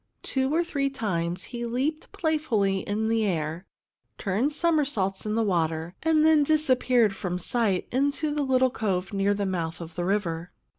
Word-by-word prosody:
Two 265 0 0
or 335 +3 +2
three 280 -5 -1
times 180 -8 -2
he 240 -1 -6
leaped 265 +7 -2
playfully 240 - 0
in 210 +3 -2
the 225 0 +1
air, 165 -2 -2 0.5
turned 215 +9 0
somersaults 285 - 0
in 215 - -1
the 230 - +2
water, 165 -3 0
and 315 -1 +3
then 315 -1 +6
disappeared 255 -7 +3
from 180 -2 -3
sight 200 0 0
in 275 +3 +2
the 295 +1 -2
little 260 -2 +3
cove 195 -5 -2
near 200 +1 +2
the 200 0 -1
mouth 170 -3 -3
of 165 -1 -8
the 175 - -3
river. 175 -3 -1
220 Hz, 165 wpm, -26 LUFS, 185-275 Hz, 0.5 s, then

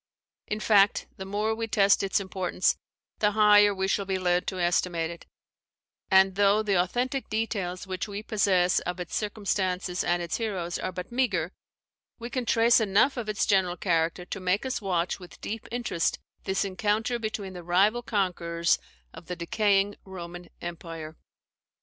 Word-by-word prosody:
] - - -67
In 215 - -2
fact, 205 -2 +4
the 190 - -7
more 210 +3 0
we 225 0 -3
test 200 -2 +4
its 195 0 +1
importance, 190 -1 0 0.4
the 210 -1 +2
higher 210 -1 +6
we 190 -1 -1
shall 200 0 0
be 190 -1 -1
led 180 -1 +1
to 185 - -3
estimate 175 -1 +1
it; 170 - -11 0.8
and, 190 0 +5
though 205 +2 +3
the 205 -2 0
authentic 245 +9 0
details 205 -5 -2
which 185 +1 -4
we 205 0 -6
possess 195 -5 +2
of 180 +1 -5
its 180 - -5
circumstances 190 -3 -1
and 175 0 +1
its 170 - -2
heroes 190 -7 -3
are 185 - -3
but 180 +3 -7
meagre, 255 0 0 0.7
we 235 +1 -7
can 250 -2 -3
trace 230 +2 +5
enough 215 +6 +3
of 235 -4 -4
its 210 - 0
general 185 -3 +2
character 170 0 0
to 195 - -5
make 185 +5 0
us 260 -2 -2
watch 180 -3 -1
with 180 -2 -13
deep 220 +1 -6
interest 235 -8 -1 0.3
this 190 +1 0
encounter 215 +5 0
between 215 -4 -4
the 180 - -7
rival 195 +7 +2
conquerors 170 -6 0 0.3
of - - -12
the 180 - -4
decaying 200 +3 +1
Roman 175 -2 -9
empire. 165 -2 -7
195 Hz, 170 wpm, -27 LUFS, 180-215 Hz, 0.8 s, higher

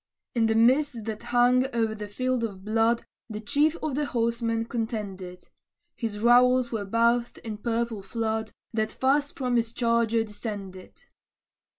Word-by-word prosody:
In 230 -2 +2
the 220 - +1
mist 245 +1 +3
that 220 -1 -4
hung 245 +2 +3
over 225 -2 +1
the 210 -1 -6
field 255 +3 -1
of 195 -4 -5
blood, 225 +2 +2 0.2
The 215 -1 -5
chief 290 +9 +2
of 310 -3 -1
the 290 +2 -1
horsemen 230 -1 0
contended; 210 -7 -5 0.5
His 225 -3 -4
rowels 245 +2 +4
were 215 -3 -2
bathed 235 +3 +1
in 215 -3 -6
purple 230 -1 -2
flood, 220 +1 -2 0.2
That 220 -1 0
fast 285 +2 +1
from 250 -3 0
his 230 -1 0
charger 230 -1 +1
descended. 205 -3 -8
230 Hz, 150 wpm, -26 LUFS, 220-245 Hz, 0.5 s, rowels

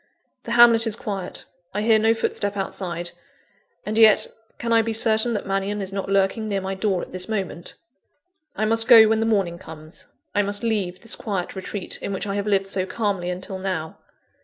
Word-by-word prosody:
The 235 - -3
hamlet 235 -1 +6
is 215 - 0
quiet; 195 -5 -6 0.3
I 210 - -1
hear 220 -1 +4
no 225 +1 +3
footstep 205 -2 -2
outside 175 -3 -3 0.7
and 215 +1 -1
yet, 220 -2 +6 0.3
can 230 -1 -1
I 230 - +5
be 225 0 -3
certain 220 +1 +3
that 210 - -3
Mannion 195 +1 -2
is 195 -1 -5
not 195 -1 -4
lurking 195 +3 +1
near 200 -2 -1
my 190 0 -4
door 190 -1 -1
at - - -10
this 185 +1 -4
moment? 190 -5 -4 0.8
I 215 - 0
must 225 +1 +3
go 225 -3 +9
when 220 0 +2
the 225 - 0
morning 190 -6 0
comes; 155 0 -11 0.3
I 205 - +2
must 205 +2 -3
leave 200 -6 -2
this 230 - -1
quiet 195 -5 -4
retreat, 190 0 -4
in 200 - -4
which 190 - -4
I 200 - -3
have 200 +1 -3
lived 195 -2 +2
so 195 -1 -1
calmly 200 -6 -2
until 185 +1 -5
now. 185 -4 -4
200 Hz, 200 wpm, -23 LUFS, 190-220 Hz, 0.8 s, go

